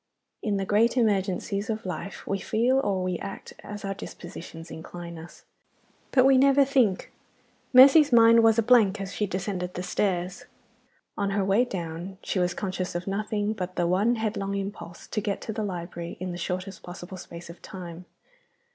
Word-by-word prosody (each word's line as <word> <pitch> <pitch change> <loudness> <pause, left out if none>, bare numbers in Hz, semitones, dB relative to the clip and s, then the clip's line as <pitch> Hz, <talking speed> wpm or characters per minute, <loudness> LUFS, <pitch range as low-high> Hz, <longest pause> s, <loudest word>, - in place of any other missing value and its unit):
IN 210 -3 0
the 195 - -1
great 225 +5 +3
emergencies 200 -2 0
of 220 -1 -3
life 185 +2 -6
we 195 - -1
feel, 240 +7 +2
or 195 -7 0
we 185 -2 -2
act, 195 - -7
as 205 -1 -7
our 195 - -2
dispositions 170 -3 -9
incline 170 +1 -8
us. 165 +2 -13 0.6
But 255 -2 +4
we 270 -1 +6
never 275 +1 +5
think. 250 -9 +1 0.6
Mercy's 275 +3 +8
mind 230 -1 +7
was 225 0 +5
a 230 - +3
blank 215 -4 +4
as 195 0 -5
she 210 - -1
descended 185 -1 -3
the 180 - -3
stairs. 185 +4 -1 0.7
On 200 - 0
her 195 -1 0
way 200 +6 +3
down 175 -1 -6
she 190 - -1
was 180 0 0
conscious 185 -3 -3
of 175 +1 -3
nothing 210 +1 -1
but 185 -3 -5
the 175 - +1
one 200 +7 +2
headlong 210 -3 -2
impulse 195 -3 -6
to 210 - -3
get 200 -1 -2
to 220 - -5
the 215 - -3
library 170 -3 -5
in 185 0 -4
the - - -5
shortest 185 +2 -4
possible 175 +1 -9
space 170 -1 -10
of 170 - -16
time. 180 -1 -9
195 Hz, 180 wpm, -26 LUFS, 180-220 Hz, 0.7 s, Mercy's